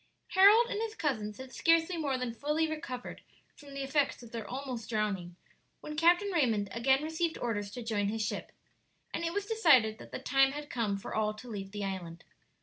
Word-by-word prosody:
Harold 410 Hz, +5 st, +7 dB
and 430 Hz, -3 st, -3 dB
his 445 Hz, -1 st, -3 dB
cousins 220 Hz, -, -2 dB
had 260 Hz, 0 st, -10 dB
scarcely 330 Hz, +1 st, +3 dB
more 285 Hz, -5 st, -1 dB
than 250 Hz, -2 st, -3 dB
fully 300 Hz, +6 st, 0 dB
recovered 305 Hz, -6 st, -6 dB, 0.3 s
from 280 Hz, -1 st, -12 dB
the 275 Hz, -, -3 dB
effects 275 Hz, -2 st, 0 dB
of 230 Hz, -, -12 dB
their 225 Hz, -3 st, -5 dB
almost 255 Hz, -2 st, -5 dB
drowning 200 Hz, -6 st, -2 dB, 0.4 s
when 300 Hz, -, -7 dB
Captain 350 Hz, +5 st, +4 dB
Raymond 230 Hz, -, +1 dB
again 265 Hz, +5 st, +2 dB
received 320 Hz, +1 st, -1 dB
orders 205 Hz, -4 st, -2 dB
to 240 Hz, +4 st, -7 dB
join 210 Hz, -3 st, 0 dB
his 220 Hz, +1 st, -1 dB
ship, -, -, -4 dB, 0.6 s
and 335 Hz, -, -2 dB
it 335 Hz, -, 0 dB
was 405 Hz, +2 st, -2 dB
decided 290 Hz, -, +4 dB
that -, -, -12 dB
the -, -, -4 dB
time 270 Hz, 0 st, +3 dB
had 295 Hz, 0 st, -7 dB
come 215 Hz, -5 st, 0 dB
for 195 Hz, -, -7 dB
all 215 Hz, -1 st, 0 dB
to 245 Hz, +4 st, -11 dB
leave 200 Hz, -4 st, -6 dB
the 205 Hz, 0 st, -4 dB
island. 175 Hz, -4 st, -6 dB
260 Hz, 200 wpm, -31 LUFS, 215-320 Hz, 0.6 s, Harold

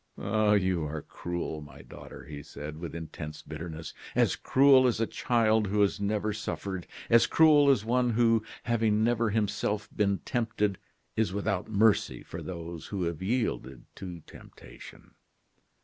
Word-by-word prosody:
"Ah! 105 Hz, 0 st, +2 dB
you 95 Hz, -4 st, +2 dB
are 75 Hz, 0 st, -4 dB
cruel, 85 Hz, -3 st, -5 dB
my 70 Hz, -1 st, -12 dB
daughter," -, -, -11 dB
he 75 Hz, -1 st, -8 dB
said, 75 Hz, +2 st, -8 dB
with 85 Hz, -1 st, -6 dB
intense 80 Hz, -2 st, -7 dB
bitterness; 80 Hz, +1 st, -7 dB, 0.2 s
"as -, -, +3 dB
cruel 135 Hz, -1 st, +5 dB
as 120 Hz, -, 0 dB
a 115 Hz, -, +2 dB
child 110 Hz, -3 st, +1 dB
who 105 Hz, +2 st, 0 dB
has 100 Hz, 0 st, +2 dB
never 105 Hz, +1 st, -1 dB
suffered 100 Hz, -3 st, -5 dB, 0.2 s
as 115 Hz, -1 st, +5 dB
cruel 150 Hz, -3 st, +6 dB
as 120 Hz, -6 st, +3 dB
one 125 Hz, +1 st, +2 dB
who, 115 Hz, -1 st, +3 dB, 0.2 s
having 110 Hz, -2 st, +1 dB
never 115 Hz, -1 st, +2 dB
himself 105 Hz, 0 st, -1 dB
been 100 Hz, -2 st, +2 dB
tempted, 110 Hz, -4 st, -1 dB, 0.4 s
is 110 Hz, -5 st, 0 dB
without 100 Hz, -1 st, -2 dB
mercy 110 Hz, 0 st, +2 dB
for -, -, -8 dB
those 85 Hz, -2 st, -7 dB
who 100 Hz, -3 st, -3 dB
have 85 Hz, -1 st, -3 dB
yielded 95 Hz, -, -2 dB
to 90 Hz, -3 st, -8 dB
temptation. -, -, -14 dB
105 Hz, 150 wpm, -29 LUFS, 85-115 Hz, 0.4 s, cruel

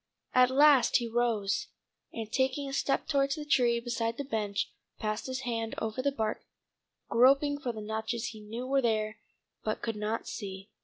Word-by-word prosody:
At 250 Hz, 0 st, +6 dB
last 280 Hz, 0 st, +6 dB
he 240 Hz, -2 st, -2 dB
rose, 230 Hz, -3 st, 0 dB, 0.4 s
and 220 Hz, -1 st, -6 dB
taking 265 Hz, +2 st, +1 dB
a 270 Hz, -, -5 dB
step 275 Hz, -, 0 dB
towards 275 Hz, -1 st, +2 dB
the 300 Hz, -2 st, -6 dB
tree 245 Hz, -5 st, +3 dB
beside 230 Hz, -1 st, -2 dB
the 285 Hz, -, -2 dB
bench, 210 Hz, -6 st, -2 dB, 0.2 s
passed 215 Hz, +2 st, -3 dB
his 260 Hz, 0 st, -3 dB
hand 230 Hz, -3 st, -2 dB
over 220 Hz, +3 st, -2 dB
the 280 Hz, +2 st, +1 dB
bark, 220 Hz, -5 st, -2 dB, 0.7 s
groping 275 Hz, +4 st, +4 dB
for 250 Hz, -4 st, -2 dB
the 220 Hz, -2 st, -7 dB
notches 220 Hz, +2 st, -3 dB
he 220 Hz, -, -10 dB
knew 225 Hz, +4 st, -6 dB
were 270 Hz, +1 st, +2 dB
there 215 Hz, -2 st, 0 dB, 0.4 s
but 215 Hz, -, -2 dB
could 225 Hz, -2 st, -2 dB
not 215 Hz, +2 st, -2 dB
see. 195 Hz, -2 st, -6 dB
235 Hz, 175 wpm, -30 LUFS, 220-265 Hz, 0.7 s, At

